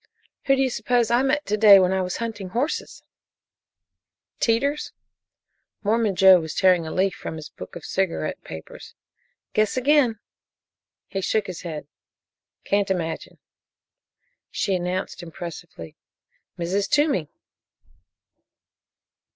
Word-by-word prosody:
"Who 275 - +4
do 270 - +2
you 260 - 0
suppose 240 -1 +1
I 240 +1 +4
met 275 +3 +1
to 210 - 0
day 205 -2 +9
when 185 -1 +3
I 190 - +1
was 180 -1 -3
hunting 220 -5 -5
horses?" 250 - -3 1.4
"Teeters?" 280 +6 0 0.9
Mormon 215 -1 +1
Joe 190 -1 +7
was 160 -1 -6
tearing 180 -4 +3
a - - -5
leaf 190 +1 +1
from - - -7
his 155 -2 -8
book - - -11
of 170 - -8
cigarette 185 - -2
papers. 80 0 -10 0.6
"Guess 215 +3 +1
again." 260 -3 +3 0.9
He 195 - -4
shook 215 +2 0
his 185 -3 -7
head. 155 -5 -6 0.8
"Can't 200 0 +1
imagine." 165 -4 -3 1.1
She 195 - -1
announced 185 +1 -2
impressively: 170 - -9 0.6
"Mrs. 190 +4 -1
Toomey!" 290 - +2
195 Hz, 120 wpm, -24 LUFS, 175-230 Hz, 1.4 s, day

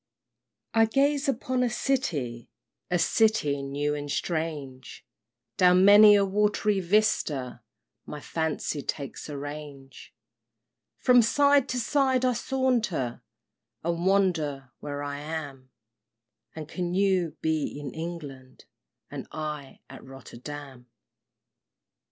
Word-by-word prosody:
I 225 0 +5
gaze 280 +4 +1
upon 255 0 -1
a 250 - +2
city, 145 - -2 0.4
A 180 - +2
city 175 -8 +2
new 145 +2 -2
and 145 0 -5
strange, 145 -6 -4 0.5
Down 180 0 +5
many 205 +1 +9
a 200 -1 +3
watery 205 +1 +1
vista 170 - 0 0.5
My 150 - -6
fancy 160 -1 -3
takes 140 +1 -5
a 145 - -5
range; 145 -2 -9 0.9
From 250 -1 +5
side 280 +3 +3
to 250 - -1
side 260 +1 +1
I 250 - +3
saunter, 235 - -1 0.6
And 170 +2 -1
wonder 160 -9 +1
where 145 -1 -5
I 145 0 -4
am; 145 -4 -6 0.9
And 155 -2 -7
can 175 +1 -3
you 185 -5 +1
be 155 -2 -1
in 140 -3 -7
England, 150 -6 -8 0.5
And - - -7
I 150 -3 -6
at 135 - -12
Rotterdam! 135 0 -10
160 Hz, 110 wpm, -27 LUFS, 145-210 Hz, 0.9 s, many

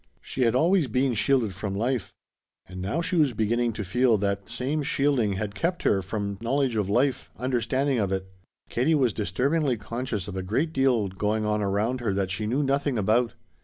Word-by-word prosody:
She 135 - -5
had 115 -1 +3
always 165 +3 +3
been 125 +2 +1
shielded 115 -1 +2
from 95 +1 -4
life. 120 -2 -1 0.6
And 95 +1 -8
now 100 - -1
she 175 +1 -1
was 145 -6 +3
beginning 115 +2 +1
to 105 - -4
feel 120 +4 +3
that 100 0 -1
that - - -11
same 130 +6 -1
shielding 135 -7 +1
had 100 +1 -3
kept 170 - -2
her 100 - +3
from 100 +1 -4
knowledge 130 +1 0
of 105 -3 0
life, 130 +4 +1
understanding 130 +2 0
of 100 -3 0
it. 95 -1 -1 0.4
Katie 140 +7 +2
was 130 -7 +2
disturbingly 130 - 0
conscious 115 -1 -4
of 100 - -6
a 95 - -2
great 135 - -1
deal 130 -7 +2
going 105 +3 -1
on 105 0 0
around 105 +6 0
her 105 -5 0
that 95 -2 -1
she 105 +4 -2
knew 135 +6 +1
nothing 140 -1 0
about. 115 +3 +2
115 Hz, 200 wpm, -26 LUFS, 100-135 Hz, 0.6 s, had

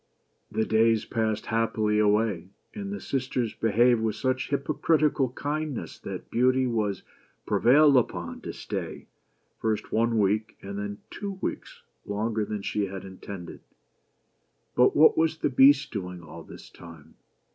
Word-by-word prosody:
The 110 - -1
days 110 0 +3
passed 110 -2 -1
happily 110 -2 0
away; 105 -4 +1 0.2
and 200 -2 -6
the 205 - -4
sisters 125 -4 -2
behaved 115 +2 +3
with 110 -1 -1
such 130 -1 -1
hypocritical 145 -1 +1
kindness 150 -1 -4
that - - -8
Beauty 130 +2 +3
was 110 -5 -1 0.4
prevailed 145 +4 +5
upon 90 -9 -1
to - - -6
stay, - - -6 0.5
first 110 -1 -2
one 115 +1 +1
week, 105 +1 0
and 100 +1 -5
then 100 0 -5
two 200 -1 -5
weeks, - - -5 0.2
longer 110 +2 -1
than 105 -1 -5
she 105 0 -1
had 95 0 -7
intended. 95 -1 -9 1.1
But 125 - +4
what 155 +2 +6
was 160 0 +1
the 145 - -1
Beast 135 +2 +5
doing 90 -4 -5
all 80 - -10
this - - -13
time 80 -3 -14
115 Hz, 140 wpm, -27 LUFS, 105-130 Hz, 1.1 s, what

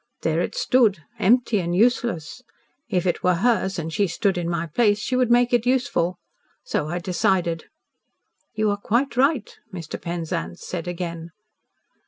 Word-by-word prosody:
There - - +1
it - - -3
stood 240 - +2 0.2
empty 235 0 +3
and 175 -1 -2
useless. 235 - +1 0.5
If 185 -4 0
it 175 - 0
were 180 -1 +3
hers, 195 -1 +1
and 165 -1 -4
she 200 +3 +2
stood 195 +3 0
in 175 -1 -2
my 170 -1 -1
place, 205 +6 +2
she 255 +4 -2
would 250 -2 +2
make 245 +1 +4
it 240 -2 +3
useful. 245 -9 +1 0.5
So 150 - -2
I 175 +3 -2
decided." 175 -2 0 0.9
"You 215 -1 +1
are 205 - -1
quite 235 +6 0
right," 265 -2 +1 0.2
Mr. 170 -5 -7
Penzance 165 - -4
said 175 -1 -5
again. 170 -1 -5
190 Hz, 160 wpm, -23 LUFS, 170-240 Hz, 0.9 s, make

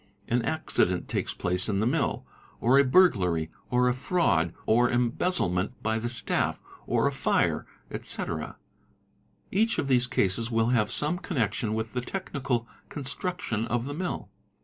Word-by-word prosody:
An 120 +1 +2
accident 115 - 0
takes - - -1
place 90 +3 -1
in 100 -2 +1
the 110 - +1
mill, 140 +5 0 0.3
or 130 +4 +5
a - - +7
burglary, 95 - +3 0.2
or 125 0 +3
a 125 - +3
fraud 125 - +1
or 120 +2 +4
embezzlement 120 - 0
by 110 0 +1
the 120 +1 -2
staff, 120 - 0 0.3
or - - +2
a - - +3
fire, - - +1 0.2
etc. - - -4 1.0
Hach 225 +4 +2
of - - 0
these 125 -2 +4
cases 115 -2 0
will 115 0 +2
have 115 -4 +2
some 155 +4 +1
connection 115 - -1
with 110 0 -3
the 125 - -1
technical 130 -6 -3 0.2
constructio 140 - -3
a - - -7
of 120 +1 -1
the 145 - -4
mill. 180 +4 -4
120 Hz, 155 wpm, -27 LUFS, 110-140 Hz, 1.0 s, a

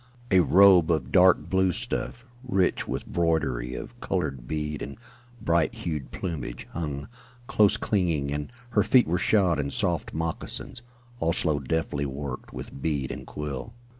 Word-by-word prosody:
A 95 - +6
robe 90 -2 +6
of 75 -6 0
dark 95 -1 +5
blue 95 -1 +2
stuff, 120 +2 -3 0.2
rich 95 -8 +1
with - - -3
broidery 70 -8 0
of - - -8
colored - - -2
bead 75 -1 -3
and 70 - -6 0.4
bright 85 -6 +1
hued 75 -5 -4
plumage, 75 -9 -5
hung, 75 -4 -4 0.4
close 105 -4 +4
clinging, 80 -9 0
and 75 +8 -4 0.2
her 105 - +4
feet 125 +4 +4
were 90 +2 +1
shod 90 -5 +3
in 70 -1 -1
soft - - -1
moccasins, 80 +7 -4 0.4
also 80 -2 +1
deftly 70 0 -1
worked 70 -1 -6
with 70 - -8
bead 70 -4 -1
and - - -7
quill. 75 - -5
80 Hz, 145 wpm, -26 LUFS, 70-95 Hz, 0.4 s, A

